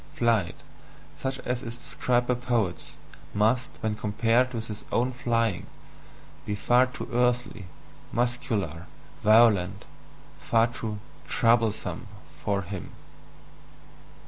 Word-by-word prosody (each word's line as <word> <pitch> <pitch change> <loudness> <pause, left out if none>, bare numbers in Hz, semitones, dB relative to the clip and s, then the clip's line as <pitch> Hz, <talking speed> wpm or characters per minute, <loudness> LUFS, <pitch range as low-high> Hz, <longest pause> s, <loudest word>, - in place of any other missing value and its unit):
"Flight," 115 -7 +2 0.6
such 135 0 -3
as 125 0 -2
is 115 -2 -6
described 125 0 0
by 125 - +2
poets, 120 -7 -1 0.4
must, 115 +5 +2
when 110 -3 0
compared 115 +4 +2
with 115 -2 -4
his 105 -2 -6
own 125 +2 +2
"flying," 115 -5 0 0.8
be 105 - -2
far 120 +5 +4
too 125 - -7
earthly, 125 -4 +1 0.5
muscular, 105 -9 -1 0.4
violent, 105 -4 +5 0.5
far 115 0 +3
too 115 -3 -4 0.3
"troublesome" 115 -2 +1 0.4
for 100 -1 0
him. 95 0 -7
115 Hz, 105 wpm, -27 LUFS, 105-120 Hz, 0.8 s, violent